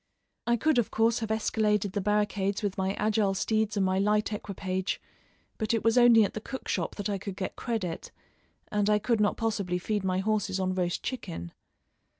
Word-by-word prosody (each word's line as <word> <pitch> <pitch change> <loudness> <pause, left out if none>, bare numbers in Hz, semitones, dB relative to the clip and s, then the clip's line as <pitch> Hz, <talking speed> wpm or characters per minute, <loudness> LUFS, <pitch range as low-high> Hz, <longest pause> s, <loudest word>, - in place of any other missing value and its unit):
I 235 0 +3
could 305 +1 +3
of 235 - 0
course 225 +1 +2
have 220 -2 -4
escaladed 210 -2 +1
the 200 - -2
barricades 205 0 0
with 200 -2 -1
my 190 0 0
agile 210 -2 +1
steeds 220 +1 0
and 195 - +3
my 185 0 +1
light 210 +1 +1
equipage, 190 -2 -3 0.6
but 220 0 +1
it 225 - -1
was 225 0 +3
only 240 -3 +7
at 200 - -1
the 215 - -5
cook 265 +4 -7
shop - - -1
that 205 - -3
I 200 -2 -2
could 195 0 -6
get 185 0 -4
credit, 200 -8 -3 0.6
and 210 0 +1
I 210 - +5
could 215 +1 +1
not 205 - +2
possibly 205 -6 -1
feed 205 +2 -2
my 185 -1 0
horses 205 -1 0
on 185 0 0
roast 180 -2 -1
chicken. 85 - -5
210 Hz, 195 wpm, -28 LUFS, 190-220 Hz, 0.6 s, only